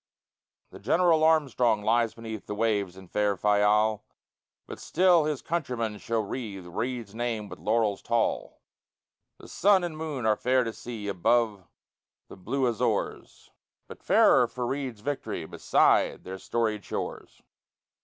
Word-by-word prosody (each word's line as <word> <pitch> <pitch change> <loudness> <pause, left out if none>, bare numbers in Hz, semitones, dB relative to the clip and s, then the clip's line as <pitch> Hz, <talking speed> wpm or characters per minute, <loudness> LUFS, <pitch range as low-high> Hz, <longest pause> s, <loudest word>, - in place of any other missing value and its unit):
The - - -11
General 165 - +3
Armstrong 130 -9 +2
lies 115 +1 +1
beneath 110 -2 -8
The 105 - -4
waves 105 -4 -1
in 95 -1 -12
far 105 +1 0
Fayal, 105 +2 +2 0.6
But - - -9
still 175 -2 +3
his 150 -3 -3
countrymen 125 -10 -3
shall 115 +1 -1
wreathe 100 -4 -6
Reid's 115 +4 -4
name 115 -2 -3
with - - -10
laurels 105 +2 0
tall; 115 -1 -1 0.7
The - - -14
sun 195 -2 +3
and 170 -3 -4
moon 155 -6 -4
are 110 -1 +3
fair 130 +3 +2
to 115 -1 -4
see 110 -1 -7
Above 100 0 +1 0.6
the - - -10
blue 130 +8 -2
Azores, 115 -3 -3 0.4
But - - -12
fairer - - +5
far 125 -1 -5
Reid's 130 -4 -4
victory 110 - -4
Beside - - +2
their 95 +1 -7
storied 110 -2 -2
shores. - - -6
115 Hz, 140 wpm, -27 LUFS, 105-130 Hz, 0.7 s, fairer